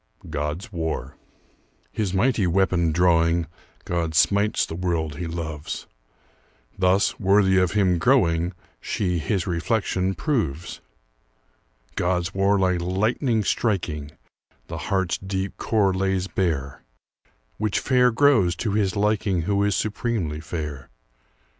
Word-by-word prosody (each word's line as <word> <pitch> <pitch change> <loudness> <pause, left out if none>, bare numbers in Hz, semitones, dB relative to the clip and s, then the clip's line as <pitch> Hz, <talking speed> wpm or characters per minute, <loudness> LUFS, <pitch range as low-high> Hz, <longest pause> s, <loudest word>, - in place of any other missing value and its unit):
GOD'S 75 +6 -4
WAR 80 -2 -3 0.8
His 105 -4 -2
mighty 105 0 +2
weapon 90 -2 +2
drawing, 85 0 +3 0.4
God 85 -2 -2
smites 100 +6 +3
the - - -8
world 80 -4 -2
he 85 +1 -4
loves; 80 -2 -5 0.9
Thus, 95 +1 +2
worthy 95 -1 +4
of 90 0 +1
him 95 -4 +2
growing, 85 -8 +2 0.3
She 90 -4 -1
his 85 +5 -1
reflection 95 +1 -1
proves. 90 - -2 1.1
God's 90 0 -1
war 100 +1 +2
like 90 -2 +1
lightning 110 - 0
striking, 85 -11 -1 0.6
The - - -6
heart's 95 -3 0
deep 95 0 -3
core 100 -4 +1
lays 95 0 0
bare, 75 -9 -2 0.8
Which 105 -2 0
fair 125 -2 +3
grows 115 -8 +3
to 105 +3 -2
his 100 -1 0
liking 100 -4 +1
Who 100 +3 +1
is 100 -1 +1
supremely 105 -8 -2
fair. 75 -3 -6
95 Hz, 115 wpm, -24 LUFS, 85-100 Hz, 1.1 s, worthy